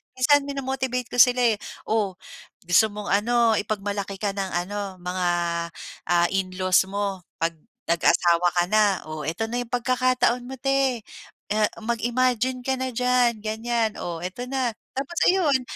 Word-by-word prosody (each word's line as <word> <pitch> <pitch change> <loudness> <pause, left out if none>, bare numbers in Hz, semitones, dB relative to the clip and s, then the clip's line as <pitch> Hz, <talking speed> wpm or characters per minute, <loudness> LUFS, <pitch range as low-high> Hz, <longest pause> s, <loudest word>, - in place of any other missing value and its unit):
minsan 285 +3 +4
mino-motivate 265 -3 -3
ko - - -4
sila 250 +1 +5
eh, - - -17 0.3
"O, 210 -4 0 0.5
gusto 180 +5 +5
mong 210 0 -6
ano, 225 +2 +3
ipagmalaki 200 -1 -3
ka 205 -2 0
ng 195 -1 -3
ano, 200 -1 -5
mga, 180 0 -1 0.8
ah, 175 0 +4
in-laws 185 -1 +2
mo 200 -1 -2 0.2
'pag 165 0 0 0.3
nag-asawa 170 +1 +3
ka 175 - +4
na? 210 -2 +3
Oh, 155 -1 -5
eto 175 +8 -2
na 240 - -2
'yong 240 - -9
pagkakataon 250 0 +1
mo 260 - -7
'te. 270 -2 +1 0.5
Ah, 215 0 +3 0.2
mag-imagine 245 +2 0
ka 265 +1 0
na 260 0 -2
diyan." 245 -2 +2
Ganyan, 225 0 -1
"o, 170 -2 -5
eto 185 +7 -5
na." 260 -2 -1 0.2
Tapos 280 +6 -4
ayun 320 -8 +3
225 Hz, 150 wpm, -24 LUFS, 195-250 Hz, 0.8 s, sila